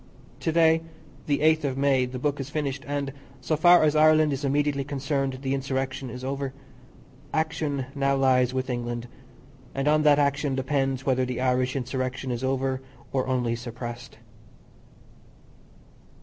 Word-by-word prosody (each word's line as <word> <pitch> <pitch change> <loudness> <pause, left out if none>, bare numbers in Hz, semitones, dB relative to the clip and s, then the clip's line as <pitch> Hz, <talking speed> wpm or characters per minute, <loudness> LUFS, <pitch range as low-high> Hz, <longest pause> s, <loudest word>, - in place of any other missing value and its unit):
To 160 - -1
day, 160 0 +4 0.5
the 145 -1 +1
8th 155 0 +4
of 135 -2 -1
May, 135 -2 +2
the 125 +1 -6
book 145 +2 -1
is 135 0 -5
finished, 140 -2 -3
and, 140 -1 -2 0.3
so 130 +5 -1
far 175 +3 +6
as 155 0 +3
Ireland 155 -1 +5
is 135 +2 -4
immediately 140 0 +1
concerned, 135 -1 -2
the 135 0 0
insurrection 135 -1 -2
is 125 +2 -8
over. 135 0 -3 0.8
Action 155 -4 -1
now 140 -1 +1
lies 130 -2 +3
with 130 0 -2
England, 120 -1 -3 0.7
and 135 +1 -1
on 150 0 +4
that 150 -1 +5
action 140 -1 +1
depends 135 -1 -1
whether 130 -1 +2
the 125 -1 -3
Irish 130 0 +1
Insurrection 130 0 -3
is 120 +1 -3
over 130 0 0 0.3
or 130 -1 0
only 125 -3 0
suppressed. 120 0 -7
135 Hz, 150 wpm, -26 LUFS, 130-145 Hz, 0.8 s, far